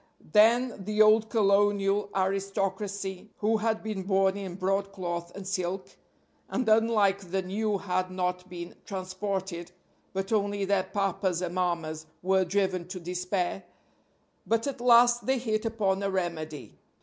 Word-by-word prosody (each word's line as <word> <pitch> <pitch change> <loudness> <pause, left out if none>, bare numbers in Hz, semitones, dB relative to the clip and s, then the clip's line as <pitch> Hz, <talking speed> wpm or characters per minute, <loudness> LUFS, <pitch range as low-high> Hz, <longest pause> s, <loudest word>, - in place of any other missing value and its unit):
Then 230 0 +4
the 210 +2 -3
old 215 +1 +6
colonial 200 -1 +2
aristocracy, 195 0 -2
who 220 +1 +2
had 220 0 -1
been 215 -3 -3
born 190 0 +2
in 195 -3 -5
broadcloth 185 -3 -2
and 200 -1 -7
silk, 185 -1 -2 0.6
and 255 -2 -1
unlike 210 -4 +3
the 190 +1 -1
new 205 +3 -1
had 185 -1 -1
not 180 0 -2
been 175 -1 -7
transported, 185 -2 -4 0.4
but 195 +3 -2
only 205 -1 +1
their 195 -1 +1
papas 190 -3 -1
and 175 -1 -3
mammas, 165 -4 -2 0.2
were 190 +1 +3
driven 185 -1 0
to 185 0 -6
despair; 180 +2 -2 0.9
but 230 0 +1
at 275 -3 -4
last 240 -1 +5
they 265 0 +3
hit 220 -3 -1
upon 200 -4 0
a 200 - 0
remedy. 165 -5 -4
195 Hz, 135 wpm, -28 LUFS, 185-210 Hz, 0.9 s, old